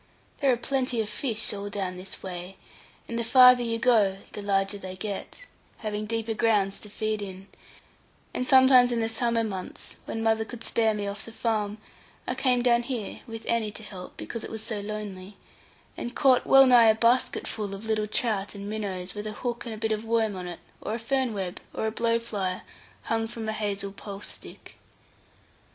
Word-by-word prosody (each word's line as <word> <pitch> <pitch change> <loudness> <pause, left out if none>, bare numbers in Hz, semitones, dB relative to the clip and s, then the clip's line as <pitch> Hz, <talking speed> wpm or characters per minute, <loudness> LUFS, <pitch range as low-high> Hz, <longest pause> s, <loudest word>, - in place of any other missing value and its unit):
There 275 -2 +4
are 245 - +2
plenty 255 -1 0
of 215 -1 -1
fish 225 -5 0
all 205 0 -4
down 190 -3 -3
this 185 +1 -6
way, 180 +1 -6 0.5
and 235 0 -3
the - - 0
farther 250 +1 +8
you 230 -1 -1
go 220 -5 +4
the 205 - -6
larger 200 0 0
they 185 -1 -7
get, 200 - -5 0.4
having 215 -1 -3
deeper 225 0 -1
grounds 210 -3 +2
to 210 - -11
feed 215 0 -2
in; 190 -1 -7 0.9
and 250 - -2
sometimes 260 -2 +7
in 235 - +1
the 225 - +1
summer 230 0 +1
months, 190 -4 -6
when 225 - -3
mother 220 0 +3
could 230 +1 -9
spare 220 -2 +2
me 205 -1 -2
off 200 0 -5
the 230 - -9
farm, 215 -2 -1 0.5
I - - -1
came 255 -2 +2
down 240 -1 +4
here, 240 -4 -4
with 225 -1 -7
Annie 230 -2 +1
to 220 - -9
help 185 -3 -9
(because 230 - -5
it - - -6
was 220 -1 -5
so 220 -2 -3
lonely), 205 -2 -6 0.6
and 240 - -5
caught 260 -3 +4
well 270 0 +9
nigh 245 -3 +7
a 220 - +6
basketful 225 -3 +1
of 200 +3 -9
little 215 -1 0
trout 210 -2 -1
and 200 0 -6
minnows, 195 -4 -3
with 210 0 -5
a 215 - -4
hook 240 +2 -4
and 225 - -4
a - - -9
bit 220 0 -1
of 215 0 -1
worm 225 -2 +1
on 180 -1 -5
it, 175 -1 -6 0.2
or 215 - -2
a - - -2
fern 260 +1 0
web, 190 -4 -4 0.2
or - - -1
a 220 - 0
blow 230 +1 +1
fly, 200 -6 -3 0.4
hung 225 0 0
from 225 -1 -6
a 220 - -1
hazel 200 -2 -2
pulse 200 0 -8
stick. - - -10
220 Hz, 200 wpm, -27 LUFS, 200-235 Hz, 0.9 s, well